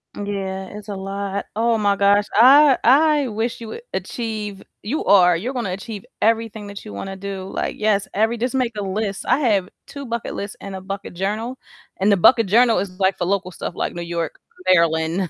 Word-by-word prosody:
Yeah, 195 -2 -4
it's 210 0 -10
a 200 - -4
lot. 195 +1 -4
Oh 230 0 +2
my 205 -1 +2
gosh, 200 +1 +4
I 270 +5 +7
I 290 +2 +4
wish 230 +2 -3
you 225 - -7
would 470 - -7
achieve 215 -4 -4 0.2
you 270 +9 -2
are, 180 -3 +6
you're 245 +9 -4
gonna 225 -8 -2
achieve 210 +3 -7 0.2
everything 225 -2 0
that 200 0 -9
you 100 - -8
wanna 195 - -6
do. 195 -1 -6
Like, - - -2
yes, 210 -2 +1
every 225 +3 +1
just 250 +3 -2
make 250 -3 +1
a - - -2
list. 195 +1 -3
I 280 - +3
have 205 -8 +1 0.2
2 280 -1 -8
bucket 235 -1 -4
lists 200 0 -5
and 195 -1 -7
a 190 - -7
bucket 195 0 -6
journal, 215 +7 -3 0.4
and 200 +2 +2
the 200 - +4
bucket 225 +3 +5
journal 230 +1 +4
is, 195 0 -2
like, 190 0 +2
for 175 - -1
local 185 -1 -1
stuff, - - -6
like - - -2
New 175 - -6
York, 170 -2 -4 0.3
Maryland 165 +1 +1
205 Hz, 205 wpm, -21 LUFS, 190-230 Hz, 0.4 s, I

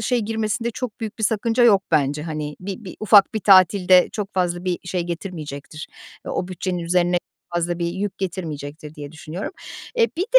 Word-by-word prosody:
şey 250 - +1
girmesinde 220 +1 -1
çok 245 -2 -6
büyük 220 0 -5
bir 220 - 0
sakınca 225 +3 +1
yok 200 -5 +6
bence. 150 -1 +2
Hani, 150 -2 -4
bir 195 +4 -6
bir 185 - -8
ufak 210 0 +6
bir 220 - 0
tatil 190 -1 +5
de 185 -1 +7
çok 210 -1 -4
fazla 175 -1 0
bir 180 -2 0
şey 180 0 -1
getirmeyecektir. 160 -4 -6 0.4
O - - -5
o 180 - -2
bütçenin 185 0 -3
üzerine 175 +1 +2 0.4
fazla 175 0 0
bir 170 - 0
yük 190 +3 -3
getirmeyecektir, 155 -5 -5
diye 145 -1 -8
düşünüyorum. 160 +4 -6 0.5
E, 465 - +6
bir 345 - +1
de, 480 +5 +7
180 Hz, 190 wpm, -22 LUFS, 165-210 Hz, 0.5 s, de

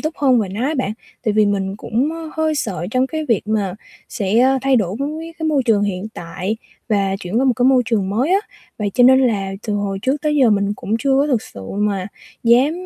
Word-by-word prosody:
túc 310 +1 -3
hơn 260 -4 +3
về 200 - -2
nó 210 +7 -3
á 315 - -1
bạn. 255 -6 -1 0.3
Tại 215 - +2
vì 210 0 +4
mình 195 -1 -1
cũng, 245 +8 -1
ơ, 325 -1 -7
hơi 315 -1 +1
sợ 190 - -3
trong 255 +2 +2
cái 315 +2 -4
việc 230 -5 +2
mà 205 -4 0 0.4
sẽ 240 +5 +2
thay 270 -1 +3
đổi 200 -2 0
với 310 +4 -4
cái 320 - -2
môi 285 -4 +2
trường 220 -4 +2
hiện 200 -1 -2
tại 185 +5 -4 0.3
và 195 -3 +1
chuyển 180 +6 -2
qua 270 - +2
một 260 - +4
cái 245 - +1
môi 260 -1 +5
trường 205 -5 0
mới 250 - 0
á, 390 - +5 0.4
vậy 205 -1 -1
cho 245 - +5
nên 260 +1 +7
là 205 -7 0
từ 215 - -1
hồi 200 -1 -2
trước 270 +4 0
tới 300 -1 +1
giờ 260 -5 +5
mình 200 -1 +1
cũng 220 - -2
chưa 270 +2 +2
có 285 - +2
thực 250 -7 +1
sự 100 - -11 0.2
mà 200 -3 0 0.4
dám 245 +5 +4
230 Hz, 245 wpm, -19 LUFS, 200-270 Hz, 0.4 s, nên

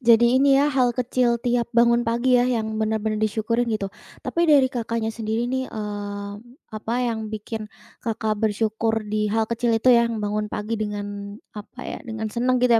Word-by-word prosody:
jadi 235 -1 +6 0.2
ini 275 0 +5
ya 290 +2 +3
hal 255 -2 +3
kecil 250 -1 +2
tiap 240 -1 +1
bangun 235 0 +5
pagi 240 +2 +2
ya, 245 - +2
yang 220 -3 -1
benar-benar 215 0 0
disyukurin 220 +3 0
gitu. 205 -3 -2 0.3
Tapi 340 0 +1
dari 275 -4 +5
Kakaknya 230 -2 -2
sendiri 225 +1 -2
nih, 260 +1 -2
eee, 205 -1 -5 0.4
apa 220 +2 -3
yang 220 -2 -2
bikin 215 0 -5 0.3
Kakak 220 -2 -2
bersyukur 220 +1 0
di 210 0 -1
hal 220 +2 +1
kecil 230 +1 0
itu 250 +3 +5
yang 235 -1 +3
bangun 210 +1 -1
pagi 215 +2 -3
dengan 205 -1 -4 0.2
apa 210 +4 -10
ya, - - -5
dengan 220 -1 -4
senang 250 +2 +1
gitu 250 -1 +3
225 Hz, 175 wpm, -23 LUFS, 215-240 Hz, 0.4 s, jadi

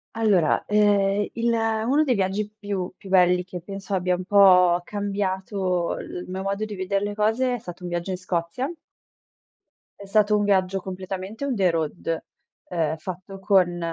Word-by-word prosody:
Allora, 200 -8 +2
ehm, 205 -1 +3
il 235 0 0
uno 225 +6 +1
dei 265 - +2
viaggi 200 0 -1
più 200 -3 -3
più 195 - -13
belli 180 -1 +4
che 180 -1 -8
penso 195 +2 -5
abbia 180 -1 +1
un 180 0 -6
po' 180 -3 +6
cambiato 190 -2 -2
il 180 - -7
mio 190 +1 -4
modo 200 +2 -2
di 215 -1 -7
vedere 195 +1 -1
le 205 0 -3
cose 225 +4 +1
è - - -3
stato 180 -4 -10
un 180 - -5
viaggio 175 +2 -3
in 185 - -2
Scozia. 185 - -3 1.3
È 200 - -9
stato 210 +1 +3
un 205 - +1
viaggio 195 -1 +2
completamente 190 +5 -6
on 270 -3 -1
the 190 -4 +3
road, 165 0 -2 0.4
ehm, 160 -3 -1
fatto 185 +4 -8
con 185 -3 +2
195 Hz, 170 wpm, -24 LUFS, 180-205 Hz, 1.3 s, po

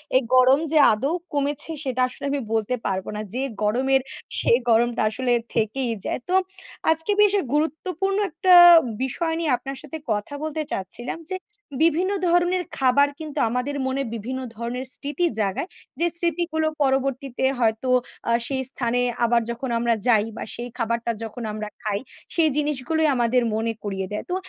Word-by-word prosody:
এই 260 - +6
গরম 255 +2 +6
যে 315 - +3 0.2
আদৌ 270 +9 -1 0.2
কমেছে, 290 +2 0
সেটা 255 -1 -1
আসলে 255 - -8
আমি 285 - 0
বলতে 225 +2 0
পারব 190 -1 -1
না। 210 - -3
যে 255 - -2 0.2
গরমের, 260 +5 +2 0.4
সে - - +1 0.2
গরমটা 235 +1 +3
আসলে 245 +2 -1 0.2
থেকেই 230 +3 0
যায়। - - -2
তো 370 - +3 0.6
আজকে 325 +5 0
বেশ 415 -1 +5 0.2
গুরুত্বপূর্ণ 335 +6 -1
একটা 365 +4 +3 0.5
বিষয় 325 +5 -1
নিয়ে 320 -5 +1
আপনার 270 +1 -7
সাথে 300 +1 -6
কথা 210 +7 -2
বলতে 310 0 -2
চাচ্ছিলাম 215 - -4
যে, - - 0 0.5
বিভিন্ন 340 +4 +2 0.2
ধরনের 350 +1 +2
খাবার 270 +2 +4
কিন্তু 305 -2 -5
আমাদের 250 +4 -2
মনে 265 +1 -1
বিভিন্ন 235 +4 -4 0.2
ধরনের 240 +3 -4
স্মৃতি 290 +5 -2
জাগায়। 205 - -1 0.3
যে 340 - +3
স্মৃতিগুলো 335 -2 0 0.2
পরবর্তীতে 270 -1 0
হয়তো 225 +2 +1 0.4
আ - - +3 0.2
সেই 265 -1 -1
স্থানে 245 -1 -1 0.2
আবার 235 0 +3
যখন 245 +2 -5
আমরা 235 0 +2
যাই 220 -3 +4
বা - - -4
সেই 240 +1 -6
খাবারটা 235 0 -1
যখন 225 +2 -7
আমরা 215 0 -5
খাই, 210 -3 -1 0.4
সেই 325 -2 +4
জিনিসগুলোই 300 +2 0
আমাদের 245 0 +2
মনে 225 +1 -1
করিয়ে 195 -2 -3
দেয়। 210 - -3
তো 360 - -1
260 Hz, 160 wpm, -23 LUFS, 235-310 Hz, 0.6 s, এই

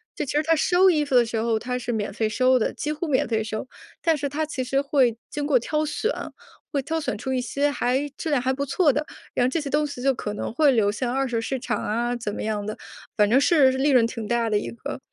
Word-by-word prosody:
就 300 - -2
其 260 - -4
实 300 +1 +2
它 325 - +3
收 360 +4 +4
衣 305 -4 +2
服 270 - -1
的 245 -1 +6
时 225 0 -3
候， 225 0 +1
它 250 +2 -3
是 245 - -3
免 210 -2 -2
费 220 - 0
收 255 +3 +3
的 220 - 0
几 300 - -3
乎 320 +3 -4
免 270 -4 +2
费 220 -2 0
收， 215 +1 -4 0.4
但 325 -2 +2
是 285 - -2
它 305 +3 -1
其 295 -4 -4
实 270 +2 +1
会 270 -5 +2
经 290 -1 -3
过 285 -4 +4
挑 305 +6 -1
选， 435 +10 -1 0.6
会 280 - +1
挑 320 +4 -2
选 290 - -2
出 260 +4 -4
一 255 - +1
些 285 +3 0
还 265 +1 0
质 325 - -3
量 280 - +2
还 255 +1 +1
不 280 +1 -2
错 290 +3 +3
的， 300 +1 -1 0.3
然 245 - +2
后 255 - +2
这 315 +4 -1
些 285 - -5
东 295 +1 +1
西 270 -3 -7
就 270 0 +3
可 210 -4 -5
能 210 - -4
会 295 +2 +4
流 210 -4 +3
向 240 +3 -2
二 270 0 +1
手 235 -2 -1
市 265 +4 -2
场 245 - -2
啊 240 +3 -1
怎 215 -3 -4
么 - - -5
样 210 -1 -2
的， 215 - -5 0.4
反 210 -1 +4
正 250 +4 +5
是 280 -4 +5
利 270 +3 +2
润 245 -4 +5
挺 230 -2 -6
大 235 -1 +1
的 210 - +2
一 - - -5
个。 265 +6 -7
260 Hz, 300 characters per minute, -24 LUFS, 235-295 Hz, 0.6 s, 的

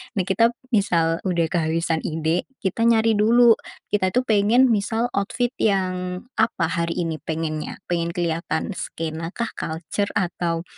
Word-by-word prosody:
Nah, 190 - +1
kita 230 +5 +2 0.2
misal 170 -6 +2
udah 170 -2 +1
kehabisan 165 -1 0
ide, 160 +2 -1 0.2
kita 230 +5 +1
nyari 225 -2 +3
dulu. 235 +2 +6 0.4
Kita 190 -3 +2
tuh 250 - +3
pengen 230 +3 +4
misal 225 +3 0
outfit 240 +5 -1
yang 185 -3 0 0.2
apa 220 -5 +2
hari 170 -1 -1
ini 160 -2 -3
pengennya. 155 -1 -4
Pengen 170 0 -1
kelihatan 165 +1 -1
skena 165 -1 -5
kah, 235 -1 -2
kalcer, 165 +5 -3
atau, 170 -3 -1
180 Hz, 140 wpm, -23 LUFS, 165-220 Hz, 0.4 s, dulu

